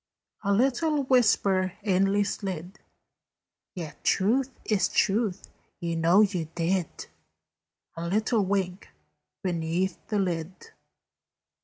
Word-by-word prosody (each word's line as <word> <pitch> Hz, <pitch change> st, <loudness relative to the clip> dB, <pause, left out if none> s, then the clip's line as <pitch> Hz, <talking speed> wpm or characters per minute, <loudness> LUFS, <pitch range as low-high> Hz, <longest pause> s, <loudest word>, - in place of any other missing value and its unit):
A 200 Hz, -, +1 dB
little 275 Hz, +7 st, +2 dB
whisper 205 Hz, -7 st, +3 dB
inly 195 Hz, 0 st, +2 dB
slid, 190 Hz, -2 st, -5 dB, 1.0 s
"Yet 160 Hz, -5 st, -8 dB
truth 245 Hz, +7 st, +2 dB, 0.2 s
is 205 Hz, -4 st, +2 dB
truth: 200 Hz, -2 st, 0 dB, 0.3 s
you 170 Hz, -1 st, -2 dB
know 165 Hz, +5 st, +5 dB
you 190 Hz, -6 st, +1 dB
did." 175 Hz, 0 st, -1 dB, 0.9 s
A 165 Hz, +1 st, -4 dB
little 215 Hz, +3 st, +1 dB
wink 190 Hz, -1 st, -2 dB, 0.5 s
beneath 175 Hz, +1 st, -1 dB
the 215 Hz, -, -1 dB
lid. 185 Hz, -, -3 dB
195 Hz, 100 wpm, -27 LUFS, 175-215 Hz, 1.0 s, know